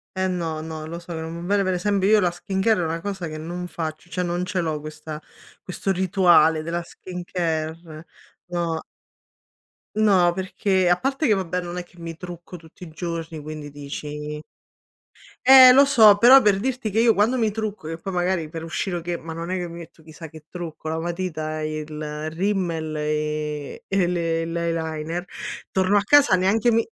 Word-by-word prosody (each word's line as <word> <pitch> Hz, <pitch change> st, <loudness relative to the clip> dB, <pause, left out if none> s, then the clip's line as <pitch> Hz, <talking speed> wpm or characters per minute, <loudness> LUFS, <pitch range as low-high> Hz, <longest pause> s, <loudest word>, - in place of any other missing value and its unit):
Eh 190 Hz, 0 st, 0 dB
no, 165 Hz, -4 st, -2 dB
no, 160 Hz, -1 st, -6 dB
lo 170 Hz, +1 st, -6 dB
so, 170 Hz, 0 st, -9 dB
che 160 Hz, -, -4 dB
non 165 Hz, +2 st, -6 dB
va 200 Hz, +2 st, +1 dB
bene. 200 Hz, -, +2 dB
Pe 185 Hz, 0 st, 0 dB
esempio, 195 Hz, +2 st, +1 dB
io 215 Hz, -1 st, +6 dB
la 180 Hz, -3 st, +2 dB
skincare 190 Hz, +3 st, 0 dB
è -, -, 0 dB
una 165 Hz, +1 st, -2 dB
cosa 190 Hz, -3 st, -4 dB
che 155 Hz, 0 st, -6 dB
non 175 Hz, +3 st, -5 dB
faccio, 160 Hz, 0 st, -6 dB
cioè, 180 Hz, 0 st, -2 dB
non 175 Hz, +1 st, -1 dB
ce 185 Hz, 0 st, -2 dB
l'ho 160 Hz, -3 st, -1 dB
questa 155 Hz, 0 st, -8 dB, 0.4 s
questo 195 Hz, +1 st, -3 dB
rituale 175 Hz, -4 st, +4 dB
della 170 Hz, +1 st, -2 dB
skincare. 165 Hz, -3 st, -5 dB, 0.4 s
No. 170 Hz, -2 st, -2 dB, 1.1 s
No, 195 Hz, -5 st, +4 dB
perché 190 Hz, 0 st, 0 dB
a 175 Hz, 0 st, +4 dB
parte 270 Hz, +3 st, -1 dB
che, 215 Hz, -, +4 dB
vabbè, 180 Hz, -2 st, -1 dB
non 175 Hz, 0 st, -6 dB
è -, -, -5 dB
che 175 Hz, 0 st, -24 dB
mi 165 Hz, -1 st, -6 dB
trucco 175 Hz, 0 st, -9 dB
tutti 165 Hz, +2 st, -15 dB
i 165 Hz, -, -9 dB
giorni, 165 Hz, -1 st, -5 dB
quindi 150 Hz, -1 st, -8 dB
dici 150 Hz, +1 st, -6 dB, 1.0 s
Eh 260 Hz, 0 st, +10 dB
lo 275 Hz, +2 st, +7 dB
so, 220 Hz, -7 st, +7 dB
però, 255 Hz, +4 st, +8 dB
per 200 Hz, -2 st, +3 dB
dirti 250 Hz, -1 st, -2 dB
che 220 Hz, +3 st, 0 dB
io 230 Hz, -1 st, +5 dB
quando 225 Hz, +6 st, +2 dB
mi 220 Hz, -3 st, +1 dB
trucco 215 Hz, -6 st, -4 dB
che 165 Hz, 0 st, -5 dB
poi, 195 Hz, -, -5 dB
magari, 175 Hz, -3 st, 0 dB
per 165 Hz, 0 st, -7 dB
uscire 175 Hz, +2 st, -3 dB
o -, -, -5 dB
che, 175 Hz, +1 st, -3 dB
ma 165 Hz, 0 st, -7 dB
non 170 Hz, +2 st, -5 dB
è 185 Hz, -, 0 dB
che 175 Hz, -1 st, -3 dB
mi 170 Hz, -, -9 dB
metto 165 Hz, -1 st, -12 dB
chissà 160 Hz, +1 st, -11 dB
che 155 Hz, 0 st, -14 dB
trucco, 160 Hz, -3 st, -7 dB
la 160 Hz, -, -2 dB
matita 160 Hz, -3 st, -3 dB
e 155 Hz, 0 st, -3 dB
il 150 Hz, 0 st, -5 dB
rimmel, 170 Hz, -4 st, -1 dB
e 150 Hz, -1 st, -3 dB
e 195 Hz, -2 st, +1 dB
le 165 Hz, -2 st, 0 dB
l'eyeliner, 165 Hz, 0 st, -3 dB, 0.5 s
torno 190 Hz, +2 st, +2 dB
a 200 Hz, -, +2 dB
casa 290 Hz, -4 st, +5 dB
neanche 205 Hz, +6 st, +2 dB
mi 225 Hz, 0 st, +3 dB
175 Hz, 195 wpm, -23 LUFS, 160-190 Hz, 1.1 s, Eh